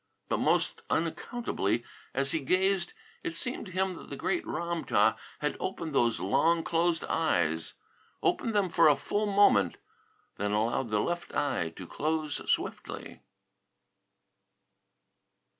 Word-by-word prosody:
But -, -, +1 dB
most -, -, +1 dB
unaccountably, 160 Hz, -, -1 dB, 0.3 s
as 135 Hz, 0 st, +1 dB
he 160 Hz, -, +1 dB
gazed, 185 Hz, +4 st, +1 dB, 0.3 s
it 165 Hz, -, -4 dB
seemed 245 Hz, +5 st, -3 dB
to -, -, -9 dB
him 190 Hz, +1 st, 0 dB
that -, -, -11 dB
the -, -, -5 dB
great 350 Hz, -, -1 dB
Ram 170 Hz, -1 st, -2 dB
tah -, -, +3 dB, 0.3 s
had -, -, 0 dB
opened 160 Hz, -3 st, -3 dB
those 120 Hz, -7 st, +2 dB
long 165 Hz, -, +2 dB
closed 165 Hz, 0 st, +1 dB
eyes; 80 Hz, -, 0 dB, 0.5 s
opened 225 Hz, -2 st, +1 dB
them 200 Hz, -3 st, +3 dB
full 165 Hz, -3 st, +6 dB
for 205 Hz, -, -2 dB
a 215 Hz, -, +1 dB
moment; 110 Hz, -, +5 dB, 0.6 s
then 100 Hz, +1 st, -1 dB
allowed 115 Hz, +3 st, +1 dB
the 105 Hz, -1 st, +2 dB
left 175 Hz, 0 st, -3 dB
eye 135 Hz, -, 0 dB
to 95 Hz, -, -8 dB
close 155 Hz, -, -1 dB
swiftly. -, -, -3 dB
160 Hz, 135 wpm, -30 LUFS, 115-185 Hz, 0.6 s, full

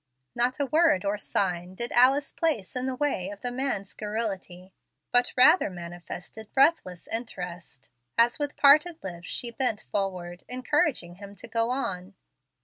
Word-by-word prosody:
Not 250 Hz, +3 st, +1 dB
a 285 Hz, -, +1 dB
word 305 Hz, -, +3 dB
or 200 Hz, +1 st, -1 dB
sign 180 Hz, -3 st, -2 dB
did 235 Hz, +4 st, -4 dB
Alice 270 Hz, +3 st, +4 dB
place 290 Hz, -, -1 dB
in 255 Hz, +1 st, -1 dB
the 260 Hz, -, -2 dB
way 250 Hz, -10 st, -1 dB
of 205 Hz, 0 st, -9 dB
the 245 Hz, -, -3 dB
man's 245 Hz, -6 st, -3 dB
garrulity, 195 Hz, -4 st, -5 dB, 0.4 s
but 245 Hz, 0 st, +3 dB
rather 255 Hz, -, +6 dB
manifested 175 Hz, +4 st, -9 dB
breathless 270 Hz, -, +2 dB
interest, 180 Hz, -, -6 dB, 0.3 s
as 235 Hz, +3 st, +4 dB
with 290 Hz, 0 st, -3 dB
parted 305 Hz, +4 st, +6 dB
lips 175 Hz, -2 st, -7 dB
she 240 Hz, -, -2 dB
bent 235 Hz, -4 st, -1 dB
forward, 180 Hz, -3 st, -3 dB
encouraging 255 Hz, -, 0 dB
him 200 Hz, 0 st, -11 dB
to 235 Hz, -, -10 dB
go 230 Hz, 0 st, 0 dB
on. 200 Hz, -7 st, -3 dB
225 Hz, 150 wpm, -27 LUFS, 185-260 Hz, 0.4 s, rather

